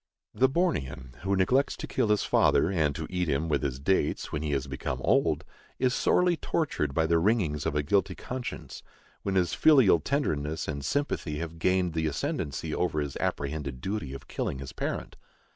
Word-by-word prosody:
The 130 +1 +3
Bornean 65 - -1
who 95 +1 0
neglects 125 +9 +2
to - - -5
kill - - 0
his 105 -1 +2
father, 85 - +3
and 80 -6 +1
to 80 - -4
eat 90 -2 -1
him 75 +4 0
with 75 -3 +1
his 65 -3 -2
dates, 75 +1 0
when 75 - -2
he 75 - -2
has 70 -2 0
become 65 -1 -4
old, - - +2 0.3
is 125 -1 +2
sorely 180 +5 +3
tortured 110 - -1
by 80 - +3
the 85 +1 +3
wringings 85 -7 +1
of 70 - -2
a 75 - +1
guilty 95 +7 +1
conscience, 125 0 -6 0.4
when 95 - -2
his 90 -3 +2
filial 135 - +6
tenderness 80 - -1
and 70 -2 -4
sympathy 110 - -1
have 80 +1 -6
gained 90 -1 +2
the 80 -1 0
ascendency 75 +1 -3
over 90 -4 0
his 70 -2 -3
apprehended 70 -2 -3
duty 95 -3 -3
of - - -11
killing - - -3
his 65 -1 -8
parent. - - -4
80 Hz, 185 wpm, -28 LUFS, 70-100 Hz, 0.4 s, filial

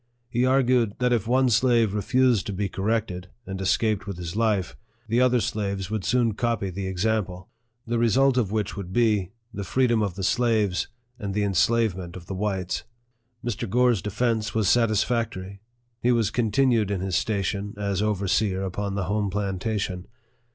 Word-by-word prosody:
He 125 +2 +2
argued 125 -5 +3
that 125 -1 +2
if 115 -3 0
one 130 +1 +3
slave 115 -2 +3
refused 125 0 +2
to 100 - -3
be 100 +1 -1
corrected, 95 -2 -2 0.2
and 95 0 -5
escaped 105 +1 +1
with 100 -3 -5
his 85 0 -6
life, 105 -5 0 0.3
the 115 +3 +2
other 125 -1 +4
slaves 100 -3 -2
would 110 -3 -2
soon 120 -1 +2
copy 115 -3 -1
the 95 +1 -4
example; 95 -1 -1 0.4
the 120 0 -1
result 130 +3 +3
of 115 -6 +1
which 105 -2 -1
would 95 -3 -6
be, 105 -4 +2 0.2
the 100 - -4
free 130 +8 +1
dom 120 -3 +2
of 100 -4 -1
the 95 - -5
slaves, 110 -4 +1 0.3
and 100 -2 -4
the 105 - +1
enslavement 100 -2 +1
of 90 -2 -9
the 95 - -6
whites. 95 -2 -2 0.6
Mr. 120 -1 -3
Gore's 120 -2 +3
defence 110 +1 -1
was 110 -3 +2
satisfactory. 110 -4 +1 0.4
He 125 - +3
was 115 -4 +2
contin 125 +3 +2
ued 110 -4 +1
in 100 -3 -1
his 95 -2 -2
station 100 0 -1
as 100 -1 -1
overseer 100 -1 0
upon 100 +1 -3
the 100 - -1
home 100 +2 -1
plantation. 100 -1 -2
105 Hz, 170 wpm, -25 LUFS, 95-115 Hz, 0.6 s, other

